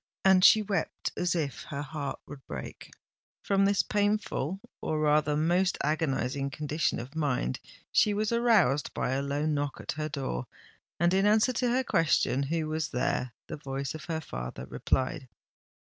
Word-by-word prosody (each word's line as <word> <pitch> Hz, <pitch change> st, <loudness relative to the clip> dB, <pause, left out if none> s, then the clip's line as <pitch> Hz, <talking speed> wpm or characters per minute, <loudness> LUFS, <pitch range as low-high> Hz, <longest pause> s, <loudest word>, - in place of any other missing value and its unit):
And 190 Hz, -1 st, +6 dB
she 215 Hz, +2 st, +8 dB
wept 195 Hz, -5 st, -2 dB
as 180 Hz, -1 st, 0 dB
if 145 Hz, -6 st, -2 dB
her 140 Hz, 0 st, -4 dB
heart 150 Hz, -2 st, -5 dB
would 140 Hz, -2 st, -11 dB
break. -, -, -7 dB, 0.5 s
From 195 Hz, 0 st, +3 dB
this 200 Hz, 0 st, +3 dB
painful—or 200 Hz, -6 st, -1 dB
rather 150 Hz, 0 st, +3 dB
most 175 Hz, +4 st, +2 dB
agonising 140 Hz, -3 st, 0 dB
condition 150 Hz, +1 st, -1 dB
of 125 Hz, +6 st, -8 dB
mind, 130 Hz, -, -1 dB, 0.3 s
she 210 Hz, -, +4 dB
was 215 Hz, +1 st, 0 dB
aroused 215 Hz, -, +3 dB
by -, -, -1 dB
a 135 Hz, +1 st, 0 dB
low 140 Hz, +2 st, -1 dB
knock 145 Hz, -2 st, -1 dB
at -, -, -4 dB
her 155 Hz, +1 st, -3 dB
door; 130 Hz, -, -3 dB, 0.5 s
and, 170 Hz, +2 st, +3 dB
in 195 Hz, +2 st, +3 dB
answer 215 Hz, +4 st, +4 dB
to 245 Hz, +1 st, 0 dB
her 255 Hz, +2 st, +2 dB
question 155 Hz, -, +2 dB
who 155 Hz, +3 st, -1 dB
was 155 Hz, 0 st, -2 dB
there, 125 Hz, 0 st, -1 dB
the -, -, -6 dB
voice 135 Hz, -2 st, -4 dB
of 155 Hz, -2 st, -8 dB
her 160 Hz, -1 st, -2 dB
father 60 Hz, -, -6 dB
replied. 130 Hz, -, -1 dB
155 Hz, 165 wpm, -29 LUFS, 140-190 Hz, 0.5 s, she